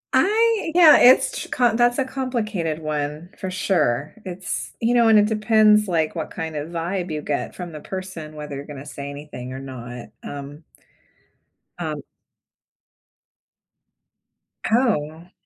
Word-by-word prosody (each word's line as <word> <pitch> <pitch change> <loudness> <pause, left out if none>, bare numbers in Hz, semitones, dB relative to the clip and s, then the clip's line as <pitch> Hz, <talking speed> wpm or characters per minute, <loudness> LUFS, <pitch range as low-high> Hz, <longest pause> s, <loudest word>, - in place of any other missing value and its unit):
I 440 -4 +3
yeah, 330 -4 +9
it's 255 +1 +6
ch - - -6
com 240 -3 +2
that's 240 +1 +3
a 270 - +1
complicated 215 - -2
one 150 +2 -3
for 190 - -4
sure. 155 -7 0
It's, 185 0 -5
you 235 +1 +1
know, 235 -2 +5
and 220 -1 +6
it 210 - +6
depends, 215 -1 +4
like, 165 -2 0
what 160 - -4
kind 160 -1 -5
of 150 +2 -4
vibe 175 +2 -3
you 150 -1 -3
get 145 - -3
from 175 -2 -7
the 155 - -8
person, 175 -4 -7
whether 150 -2 -6
you're 140 +1 -6
gonna 145 -1 -8
say 140 -1 -7
anything 140 -3 -8
or 130 - -6
not, 125 -2 -8
um 145 +2 -8 1.2
um - - -4 2.7
Oh, 225 - +2
ah. 180 - -24
175 Hz, 150 wpm, -22 LUFS, 150-220 Hz, 2.7 s, yeah